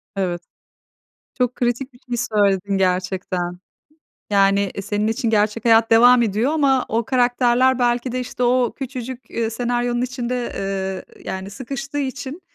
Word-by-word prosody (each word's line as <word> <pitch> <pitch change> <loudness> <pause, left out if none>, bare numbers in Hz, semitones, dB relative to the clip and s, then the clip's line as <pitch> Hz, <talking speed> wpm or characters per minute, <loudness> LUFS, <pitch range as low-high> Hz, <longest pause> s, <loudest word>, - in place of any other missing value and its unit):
Evet. 180 -3 -2 1.0
Çok 250 -1 +1
kritik 250 +2 -1
bir 245 - -19
şey 245 -1 -5 0.2
söyledin 200 -1 +2
gerçekten. 185 -1 -1 0.7
Yani, 200 0 +4
eee, 200 - -4
senin 205 +1 -1
için 225 +1 0
gerçek 210 +1 +1
hayat 225 -1 +5
devam 240 +2 +7
ediyor 225 +6 +1
ama 275 -4 +2
o 225 +1 0
karakterler 250 0 +2
belki 240 0 +1
de, 255 - -1
işte, 250 0 -5
o 245 -1 +2
küçücük, 255 -2 -7
eee, 225 -1 -1
senaryonun 240 +1 -1
içinde, 250 -1 -3 0.6
eee, - - -17
yani, 190 +1 -5
sıkıştığı 275 +5 -5
için, 280 +3 -4
240 Hz, 145 wpm, -21 LUFS, 205-255 Hz, 1.0 s, devam